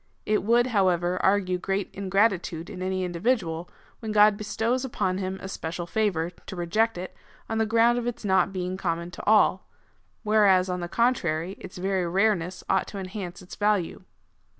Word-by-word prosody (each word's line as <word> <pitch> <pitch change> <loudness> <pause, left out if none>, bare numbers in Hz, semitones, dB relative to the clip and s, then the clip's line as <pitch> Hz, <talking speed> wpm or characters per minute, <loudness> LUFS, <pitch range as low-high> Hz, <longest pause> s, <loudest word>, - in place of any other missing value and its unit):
It 215 0 +1
would, 235 +4 +3
liow 200 -7 +3
ever, 175 +1 -1
argue 190 -2 +2
great 195 +1 -2
ingratitude 190 -4 0
in 185 -2 -7
any 185 0 -1
individual, 175 -2 -1 0.3
when 220 -2 -5
God 210 0 +6
bestows 225 +4 -1
upon 190 -7 -1
him 190 0 -3
a - - -4
special 175 -2 -5
favour, 175 -3 0
to 185 - -11
reject 215 +5 0
it, 180 +1 -7 0.3
on 225 - -2
the 220 - +2
ground 230 +2 +4
of 240 - -4
its 240 -2 -4
not 190 -1 +3
being 185 -1 -3
common 170 -1 -2
to - - -9
all, 215 0 +4 0.5
whereas, 200 -4 +4
on 180 - -2
the 175 - -4
contrary, 190 -7 +1
its 185 - -10
very 185 -1 0
rareness 185 -1 0
ought - - +1
to 200 - -8
enhance 185 -2 -6
its 180 - -10
value. 205 -5 0
190 Hz, 175 wpm, -26 LUFS, 180-215 Hz, 0.5 s, God